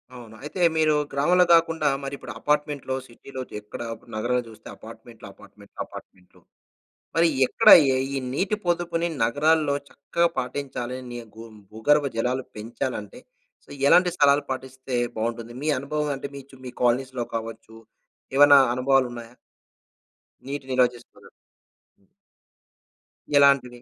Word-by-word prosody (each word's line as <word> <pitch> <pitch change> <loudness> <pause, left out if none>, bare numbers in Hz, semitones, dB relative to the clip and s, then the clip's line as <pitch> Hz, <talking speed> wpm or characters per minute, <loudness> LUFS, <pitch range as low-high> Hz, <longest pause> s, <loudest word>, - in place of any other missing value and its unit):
అవును. 115 -3 -12
అయితే 155 +5 -5 0.2
మీరు 155 -1 +3 0.2
గ్రామంలో 175 +6 +3
కాకుండా 165 -2 +3 0.2
మరి 135 - -5
ఇప్పుడు - - -9
అపార్ట్మెంట్‌లో, 145 -3 -1
సిటీ‌లో 130 +2 -10
జెక్కడ 105 +2 -8 0.3
నగరంలో 125 +3 0
చూస్తే 110 -1 -14
అపార్ట్మెంట్‌లు, - - -13
అపార్ట్మెంట్‌లు, - - -19
అపార్ట్మెంట్‌లు. 90 -1 -14 0.7
మరి 165 +1 +4 0.2
ఎక్కడ - - +3 0.2
ఈ - - +1 0.3
ఈ - - 0 0.2
నీటి 190 +8 0
పొదుపుని 170 -1 0 0.2
నగరాల్లో 145 +4 +2
చక్కగా 170 +4 0
పాటించాలని 125 -2 -5 0.2
గు 115 - -10 0.3
భూగర్భ 145 +7 +2
జలాలు 125 +3 -1
పెంచాలంటే 110 -1 -5 0.4
సో, - - -26 0.2
ఎలాంటి 180 +4 +5
సలహాలు 145 0 +4
పాటిస్తే 130 0 -5 0.2
బాగుంటుంది? 115 +1 -4
మీ 150 - -3
అనుభవం 150 +2 -2
అంటే 135 +1 -6
మీ 140 - -7
చు 135 - -15
మీ - - -5
కాలనీస్‌లో 125 +1 +1
కావచ్చు? 115 0 -7 0.6
ఏవన్నా 145 0 +8 0.2
అనుభవాలు 130 +1 +2
ఉన్నాయా? 120 -1 -10 1.1
నీటి 140 0 -5
నిల్వ 130 -1 +4
చేసుకున్నారు. 120 - -17 2.1
ఎలాంటివి? 130 -4 +3
130 Hz, 120 wpm, -24 LUFS, 120-145 Hz, 2.1 s, ఏవన్నా